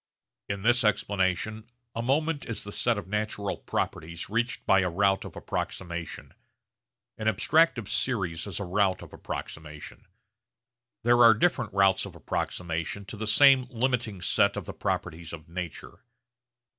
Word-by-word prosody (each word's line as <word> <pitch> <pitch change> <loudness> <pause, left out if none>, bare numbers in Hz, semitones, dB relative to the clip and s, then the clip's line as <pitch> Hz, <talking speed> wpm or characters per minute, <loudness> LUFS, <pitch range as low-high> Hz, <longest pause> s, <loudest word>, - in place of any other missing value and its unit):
In 100 -1 -3
this 120 +2 +4
explanation 105 +1 0 0.2
a 115 - -2
moment 145 +5 0
is 115 -2 -3
the 105 - -7
set 120 +2 +1
of 100 - -6
natural 105 -1 -2
properties 85 +4 -4
reached 115 +3 -1
by 95 - +5
a 90 -1 +1
route 95 +2 +2
of - - -9
approximation. 85 -2 -5 0.9
An 110 - -2
abstractive 125 - +3
series 95 -6 -1
is 100 - -4
a - - -2
route 95 +1 +1
of - - -13
approximation. 75 0 -8 1.0
There 120 +1 +5
are 115 -1 +8
different 110 -4 +1
routes 95 0 +3
of 90 - -12
approximation 85 +3 -3
to 105 - -8
the 110 +1 -4
same 130 +3 +6
limiting 120 -5 -1
set - - +3
of - - -4
the - - -6
properties 85 +1 -3
of 80 -1 -9
nature. 85 -1 -7
100 Hz, 145 wpm, -28 LUFS, 90-115 Hz, 1.0 s, are